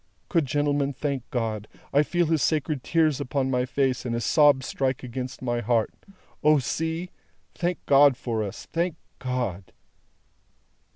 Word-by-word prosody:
Good 165 -6 +2
gentlemen, 145 +1 +1
thank 135 -2 -3
God! 110 -4 -2 0.3
I 145 - +6
feel 175 +3 +1
his 160 -2 +1
sacred 155 -3 0
tears 155 -4 +2
upon 130 +1 -1
my 125 0 +1
face, 130 -1 0
and 120 -2 -2
his 120 - -2
sobs 145 -4 +4
strike 130 -1 -1
against 130 +1 -6
my 120 -1 0
heart. 115 -1 +1 0.5
O, 150 0 +6
see! 160 +6 -2 0.4
Thank 175 -1 -2
God 140 -2 +6
for 115 -4 -2
us, 100 -2 -5
thank 170 0 0 0.2
God!" 120 -8 -3
135 Hz, 150 wpm, -26 LUFS, 125-150 Hz, 0.5 s, I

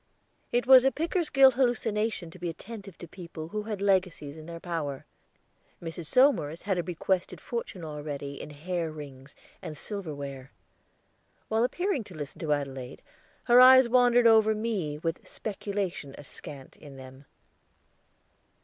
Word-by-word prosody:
It 245 0 +1
was 260 0 +8
a 270 - +4
Pickersgill 300 -5 +3
hallucination 225 -7 0
to 185 - -13
be 175 0 -3
attentive 195 +2 -9
to 175 - -10
people 170 -2 -9
who 215 +3 -3
had 210 -2 -4
legacies 185 -7 0
in 155 0 -11
their 170 0 -7
power. 160 -6 -4 0.7
Mrs. 165 -1 -7
Somers 210 - +3
had 190 -3 0
a - - +2
bequested 180 +1 -2
fortune 215 -7 -5
already 145 -2 -6
in - - -8
hair 165 +3 -3
rings 140 -2 -11 0.3
and 155 -2 -7
silver 190 -4 -5
ware. 140 -1 -8 1.0
While 220 +1 +2
appearing 350 - -1
to 185 - -12
listen 145 -2 -7
to 155 -3 -2
Adelaide, 135 -3 -3 0.4
her 245 0 +7
eyes 260 0 +9
wandered 245 0 +4
over 220 -1 +6
me 205 -9 -2
with 165 +2 -4
speculation 195 -8 -4
askant 140 -1 -11
in 145 -3 -13
them. 130 +1 -12
175 Hz, 145 wpm, -28 LUFS, 150-225 Hz, 1.0 s, eyes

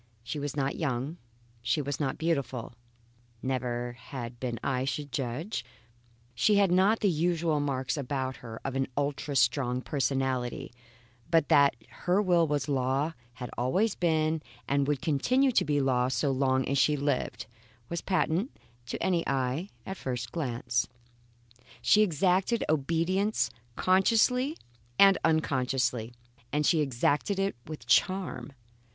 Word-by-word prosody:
She 130 +5 -4
was 145 -1 -4
not 135 0 -1
young; 140 +2 -2 0.4
she 135 - 0
was 145 -1 -3
not 135 -3 -1
beautiful; 140 -8 -2 0.7
never 125 -2 -2
had 120 0 -8
been 120 -3 -3
I 130 -2 0
should 145 +1 -3
judge, 135 - -3 0.7
she 205 - +3
had 200 -3 +4
not 200 +5 +3
even 185 -5 +3
the 155 - -2
usual 165 -3 +1
marks 135 0 -1
about 130 -1 -2
her 115 -2 -9
of 135 -1 -3
an 135 0 0
ultra 145 0 -2
strong 125 0 +2
personality; 130 -2 -1 0.6
but 165 -3 +3
that 140 -5 +5
her 180 +3 0
will 175 -5 +3
was 145 -1 -1
law, 135 +3 0 0.2
had 125 -1 -7
always 185 - +2
been, 160 -2 +1 0.3
and 140 0 +1
would 145 -2 -1
continue 250 - +2
to - - +3
be 145 -1 +1
law 125 -2 +2
so 130 +2 0
long 130 0 +1
as 140 +1 +1
she 150 +1 +3
lived, 135 -4 -1 0.4
was 170 +4 -3
patent 185 - 0 0.4
to - - -4
any 175 -3 +2
eye 135 +7 -1 0.2
at 190 - -4
the - - -15
first 120 -3 -3
glance. 120 -5 -1 0.9
She 120 - +5
exacted 190 +4 +2
obedience 170 +8 +1 0.2
consciously 235 - +3 0.4
and 195 -1 +7
unconsciously, 125 -6 0 0.4
and 150 +1 +1
she 165 - +4
exacted 145 - +1
it 195 -4 0
with 150 -6 -8
charm. 185 +5 +1
145 Hz, 145 wpm, -29 LUFS, 130-170 Hz, 0.9 s, and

